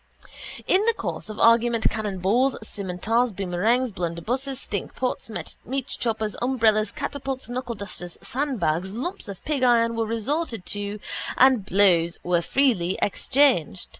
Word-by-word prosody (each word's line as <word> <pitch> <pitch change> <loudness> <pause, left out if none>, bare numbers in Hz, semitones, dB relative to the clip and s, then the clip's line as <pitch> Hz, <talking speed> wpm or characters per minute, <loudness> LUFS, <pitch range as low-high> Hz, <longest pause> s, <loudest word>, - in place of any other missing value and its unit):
In 380 +2 +3
the 460 - +3
course - - -4
of 215 - -7
the - - +1
argument 230 0 +4
cannonballs, 215 +5 +1
scimitars, 215 +5 0
boomerangs, 200 +7 +1
blunderbusses, 215 +10 -2
stinkpots, 255 -2 -3 0.4
meatchoppers, 230 -5 -2
umbrellas, 220 -4 +2
catapults, 270 +1 -4
knuckledusters, 210 -8 -5
sandbags, 195 - -1
lumps 265 +3 -4
of 200 -2 -9
pig 295 -3 -1
iron 230 -2 +4
were 225 -1 -1
resorted 230 - -2
to 205 +1 -4 0.4
and 255 -6 +5
blows 175 -4 +3
were 175 -1 +2
freely 200 -5 +1
exchanged. 205 - +2
225 Hz, 120 wpm, -24 LUFS, 195-255 Hz, 0.4 s, and